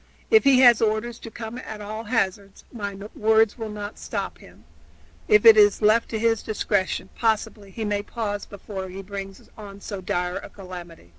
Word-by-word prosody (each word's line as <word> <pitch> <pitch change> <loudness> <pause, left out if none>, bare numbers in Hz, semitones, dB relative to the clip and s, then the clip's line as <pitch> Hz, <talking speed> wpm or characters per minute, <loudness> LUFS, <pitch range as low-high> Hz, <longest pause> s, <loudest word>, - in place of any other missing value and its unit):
If 440 -1 +6
he 265 -2 +6
has 240 -3 +7
orders 225 +2 0
to 230 - -9
come 225 +2 -7
at 220 -4 -8
all 215 +2 -6
hazards, 200 -3 -2
my 200 -4 -5 0.2
words 220 0 +3
will 220 -1 -4
not 210 0 -7
stop - - -5
him; - - -17 0.6
if 425 +1 +5
it 450 -1 +10
is 415 0 +6
left 215 +2 +4
to 225 - -2
his 225 0 +1
discretion, 205 -3 -1
possibly 215 -2 -1
he 220 +3 -5
may 205 -1 0
pause 205 -2 -4
before 195 -1 -7
he 190 +2 -8
brings 195 0 -8
on 200 -2 -10
so 200 -1 -6
dire 180 0 -2
a - - -8
calamity." 175 - -11
210 Hz, 180 wpm, -24 LUFS, 195-225 Hz, 0.6 s, it